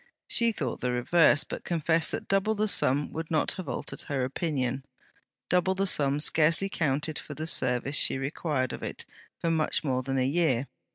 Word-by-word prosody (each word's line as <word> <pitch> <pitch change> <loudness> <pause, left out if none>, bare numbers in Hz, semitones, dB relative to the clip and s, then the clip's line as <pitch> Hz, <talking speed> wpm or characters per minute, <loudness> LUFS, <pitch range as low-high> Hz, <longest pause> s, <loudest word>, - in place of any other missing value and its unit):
She 235 -1 +3
thought 135 - -4
the 125 - -1
reverse, 145 +5 +4
but - - -7
confessed 165 -1 +1
that - - -5
double 195 +2 +1
the 215 +1 0
sum 145 -7 +2
would 160 0 -5
not 155 - +1
have 185 - -6
altered - - -5
her 140 -3 -1
opinion. 135 -2 -2 0.6
Double 180 +3 +1
the 195 +1 0
sum 145 -6 +3
scarcely 165 +5 +2
counted 150 -1 -2
for 150 - -9
the 155 - -5
service 135 -2 0
she - - +5
required 135 -1 -2
of - - -7
it - - -5 0.3
for 165 - -1
much 160 -1 +1
more 130 -3 0
than 135 +1 -3
a 130 - +1
year. 140 -4 +1
150 Hz, 185 wpm, -27 LUFS, 135-170 Hz, 0.6 s, she